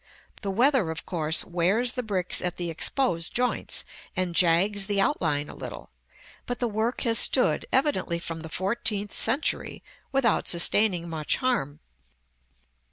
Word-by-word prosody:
The 200 - -4
weather 240 - +2
of 160 +1 -6
course 160 -2 +1
wears 190 +8 +1
the 250 - -3
bricks 195 -6 -1
at 180 -1 -3
the 175 -2 -3
exposed 165 - 0
joints, 250 0 -1 0.3
and 185 -2 -1
jags 190 +4 +3
the 205 -1 0
outline 155 - 0
a - - -10
little; - - -9 0.6
but 245 -1 -2
the 245 - -1
work 220 +3 -2
has 230 -2 +3
stood, 255 - +2
evidently 255 - 0
from 165 -1 -6
the 160 0 -9
fourteenth 205 +2 -2
century, 265 +7 +1 0.3
without 265 -5 +1
sustaining 175 0 +3
much 155 -3 0
harm. 200 - -2
195 Hz, 145 wpm, -25 LUFS, 170-240 Hz, 0.6 s, jags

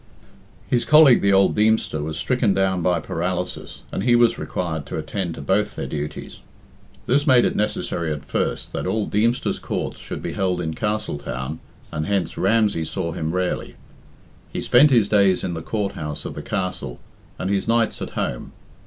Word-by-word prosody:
His 120 -1 +1
colleague, 150 -5 +7
the 100 - +3
old 95 0 +4
Deemster, 105 -7 +2
was 75 +1 -4
stricken 110 +3 +1
down 95 -2 +1
by 90 0 +2
paralysis, 90 +3 -4
and - - -2
he 120 -1 +4
was 120 -1 +4
required 80 -5 -3
to - - -4
attend 90 -5 -3
to 70 - -8
both 100 +7 +1
their - - -4
duties. 75 0 -5 0.7
This 145 +4 +2
made 125 -3 +6
it - - 0
necessary 85 -5 -1
at 75 -1 -5
first - - -2
that - - -3
all 110 -2 0
Deemster's 115 +4 0
Courts - - -4
should - - -7
be - - -3
held 90 -2 0
in 80 -2 -2
Castletown, 80 - -3 0.3
and 75 +1 -3
hence 100 -3 0
Ramsey 105 -4 +2
saw 85 +1 -3
him 80 -1 -3
rarely. 90 +1 -2 0.8
He - - -3
spent 140 +5 +6
his 115 -6 +4
days 100 -3 +3
in 90 - -2
the 80 - -4
Court 105 +2 -2
house 75 -1 -5
of - - -4
the - - -6
Castle 90 -10 -4 0.4
and 95 - -2
his 100 +1 0
nights 115 0 +1
at - - -4
home. - - -3
95 Hz, 180 wpm, -22 LUFS, 80-110 Hz, 0.8 s, colleague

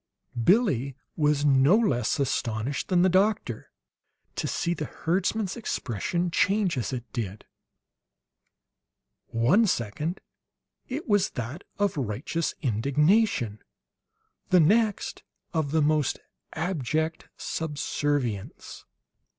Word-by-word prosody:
Billie 140 - +3 0.2
was 150 -2 +2
no 140 +7 +5
less 140 - +1
astonished 125 -1 -1
than 180 -2 +3
the - - +5
doctor 190 - +1 0.7
to - - -2
see 170 - -1
the 155 -3 -4
herdsman's 190 +5 -1
expression 170 - -2
change 195 0 +2
as 125 0 -2
it 125 -3 -3
did; 105 -4 -4 1.8
one 140 - +3
second 150 - -2 0.7
it 275 +6 -5
was 205 -3 +3
that 125 - -4
of 205 -5 0
righteous 135 +7 -2
indignation, 140 - +2 0.9
the 180 - +6
next, 210 +5 +2 0.3
of 160 -4 0
the 155 +1 +2
most 150 -2 +2 0.4
abject 160 -1 -2
subservience. 145 -7 -3
155 Hz, 100 wpm, -27 LUFS, 130-185 Hz, 1.8 s, the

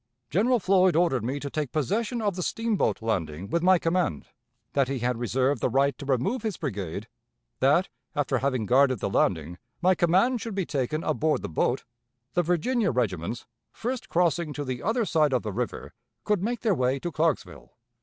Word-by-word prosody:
General 230 - +3
Floyd 185 -3 +3
ordered 160 -9 +2
me 130 +5 -2
to 140 0 -6
take 150 -4 -2
possession 215 - -1
of 205 -3 0
the 180 - -3
steamboat 225 - 0
landing 90 -4 -2
with 170 - +1
my 185 +1 +5
command; 175 +2 0 0.5
that 140 -2 +2
he 135 0 -2
had 120 -1 -1
reserved 130 +3 0
the - - +2
right 135 +2 +2
to 140 - -7
remove 140 - 0
his 215 -4 -3
brigade; 100 - -4 0.5
that, - - +4 0.3
after - - +1
having 130 -5 0
guarded 130 +2 +4
the 100 - -3
landing, 85 -2 0 0.2
my 185 +1 +4
command 190 +7 +2
should 225 -2 -5
be 195 -3 0
taken 150 +2 -2
aboard 155 0 0
the - - -4
boat; 120 +10 0 0.5
the 175 - +3
Virginia 180 +8 +1
regiments, 115 -4 -2 0.3
first 250 +2 -4
crossing 170 -2 +1
to 145 - -4
the 130 -2 -4
other 225 +3 +1
side 155 -6 +2
of 125 - +1
the 105 -2 -4
river, - - -4 0.3
could 210 -3 +1
make 235 +4 -2
their 220 -4 +2
way 130 -3 +1
to 175 +5 -4
Clarksville. 155 - -2
155 Hz, 185 wpm, -26 LUFS, 125-185 Hz, 0.5 s, my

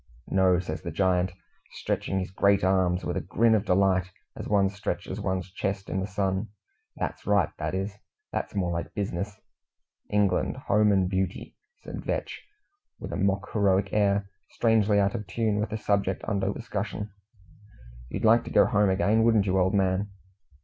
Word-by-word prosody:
"No," 95 -2 +4
says 85 -3 -4
the 85 - -5
giant, 90 +1 +1 0.4
stretching 95 - -2
his 95 -1 -3
great 100 0 +3
arms 95 -1 +2
with - - -2
a - - -1
grin 115 0 +2
of 110 -1 +2
delight, 95 -1 +2 0.3
as - - -6
one 100 -2 +3
stretches 100 0 -4
one's 95 -2 -2
chest 95 0 -3
in 95 - -1
the 95 - -2
sun, 95 0 -1 0.5
"that's - - -5
right, 100 -5 +3
that - - -2
is. 100 +2 -4 0.3
That's - - -4
more 90 -3 0
like 85 0 -4
bizness." 100 0 -3 0.7
"England, 100 -3 +1
home 105 0 +2
and 95 -2 +3
beauty!" 95 0 -3 0.3
said - - -7
Vetch, - - -3 0.6
with - - -7
a - - -2
mock 100 0 0
heroic 100 -2 +2
air, 100 -1 +2 0.2
strangely 110 -3 +2
out 100 0 +2
of 105 -5 -5
tune 105 +2 0
with 105 - -1
the 110 - -3
subject 100 -3 0
under 100 -2 0
discussion. 105 -1 -4 1.0
"You'd - - -3
like 115 +2 +5
to - - -6
go - - +5
home 105 -3 +2
again, 100 +4 +2
wouldn't 110 -3 +4
you, 95 -1 +2
old 95 +2 +2
man?" 95 +1 +1
100 Hz, 170 wpm, -27 LUFS, 95-105 Hz, 1.0 s, like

